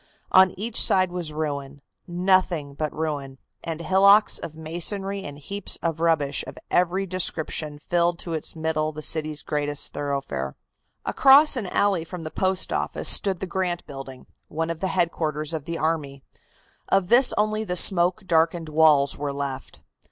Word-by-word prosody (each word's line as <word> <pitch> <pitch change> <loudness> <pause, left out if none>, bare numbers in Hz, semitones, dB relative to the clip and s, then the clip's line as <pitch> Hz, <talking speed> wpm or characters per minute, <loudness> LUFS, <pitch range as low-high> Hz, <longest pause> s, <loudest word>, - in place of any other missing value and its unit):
On 190 0 +7
each 225 +2 -1
side 185 -1 +3
was 175 -3 -4
ruin, 145 -2 -4 0.3
nothing 175 -4 +1
but 150 +1 -3
ruin, 145 -4 -4 0.3
and 165 0 -5
hillocks 200 +4 +4
of 155 - -7
masonry 190 +5 -2
and 145 -4 -8
heaps 200 +8 -5
of 165 -1 -1
rubbish 155 -4 +1
of - - -9
every 180 +2 +1
description 160 -4 -1
filled 170 +3 0
to 170 -1 -5
its 160 +1 -3
middle 160 -1 -1
the 155 0 -8
city's 155 -1 -2
greatest 145 -1 -3
thoroughfare. 140 - -4 0.5
Across 280 +3 +6
an 225 -7 -3
alley 195 -2 +1
from 170 +1 -8
the 155 - -6
Post 185 -1 0
Office - - -1
stood 190 -3 +2
the - - -2
Grant 180 -1 -3
Building, 135 -2 -10 0.2
one 165 +2 -3
of 165 - -6
the 190 - -1
headquarters 155 -3 -1
of 155 -3 -4
the 170 0 -4
army. 150 -4 -2 0.7
Of 195 -2 +2
this 245 +2 +6
only 215 +1 0
the 180 -4 -3
smoke 180 +2 +3
darkened 165 -1 +1
walls 150 -3 +4
were 145 -1 -2
left. 140 -1 -6
165 Hz, 160 wpm, -24 LUFS, 150-185 Hz, 0.7 s, On